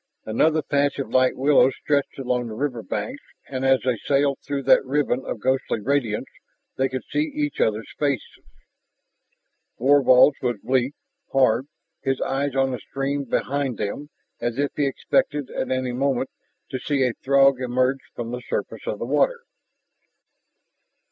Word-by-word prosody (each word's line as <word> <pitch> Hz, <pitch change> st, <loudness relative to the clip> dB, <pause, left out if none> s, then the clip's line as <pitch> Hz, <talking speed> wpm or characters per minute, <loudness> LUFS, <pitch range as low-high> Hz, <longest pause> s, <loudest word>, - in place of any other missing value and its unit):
Another 155 Hz, +8 st, +2 dB
patch 140 Hz, -1 st, +1 dB
of 135 Hz, -, -4 dB
light 130 Hz, 0 st, +3 dB
willows 135 Hz, -1 st, +4 dB
stretched 145 Hz, -2 st, 0 dB
along 125 Hz, -2 st, -1 dB
the 110 Hz, -, -6 dB
river 125 Hz, -2 st, -2 dB
banks, 265 Hz, -, -4 dB, 0.3 s
and 130 Hz, -1 st, -4 dB
as 135 Hz, -1 st, +4 dB
they 125 Hz, -4 st, +1 dB
sailed 140 Hz, 0 st, +2 dB
through 140 Hz, -1 st, -3 dB
that 135 Hz, -, +5 dB
ribbon 135 Hz, -1 st, 0 dB
of 115 Hz, -, -4 dB
ghostly 130 Hz, -1 st, 0 dB
radiance 120 Hz, -2 st, 0 dB, 0.5 s
they 135 Hz, 0 st, +1 dB
could 130 Hz, 0 st, -4 dB
see 300 Hz, 0 st, 0 dB
each 295 Hz, -1 st, -1 dB
other's 110 Hz, 0 st, 0 dB
faces. 140 Hz, -5 st, -1 dB, 1.4 s
Thorvald's 135 Hz, +1 st, +5 dB
was 120 Hz, -3 st, 0 dB
bleak, 130 Hz, +2 st, +1 dB, 0.4 s
hard, 130 Hz, -1 st, +3 dB, 0.3 s
his 135 Hz, -1 st, -1 dB
eyes 135 Hz, 0 st, -1 dB
on 135 Hz, 0 st, +2 dB
the 125 Hz, -, -3 dB
stream 140 Hz, +5 st, -3 dB
behind 135 Hz, 0 st, -1 dB
them 110 Hz, +8 st, -4 dB, 0.3 s
as 120 Hz, 0 st, -2 dB
if 145 Hz, 0 st, 0 dB
he 145 Hz, -2 st, +1 dB
expected 145 Hz, +1 st, 0 dB
at -, -, -3 dB
any 130 Hz, -1 st, -1 dB
moment 130 Hz, 0 st, 0 dB, 0.4 s
to 130 Hz, -, -3 dB
see 140 Hz, 0 st, 0 dB
a 125 Hz, -2 st, +1 dB
Throg 135 Hz, -1 st, +4 dB
emerge 130 Hz, +2 st, +1 dB, 0.2 s
from 120 Hz, -1 st, -5 dB
the 125 Hz, 0 st, -4 dB
surface 115 Hz, -2 st, -4 dB
of 105 Hz, -, -2 dB
the 115 Hz, -, -4 dB
water. 150 Hz, -, +1 dB
135 Hz, 155 wpm, -23 LUFS, 125-140 Hz, 1.4 s, that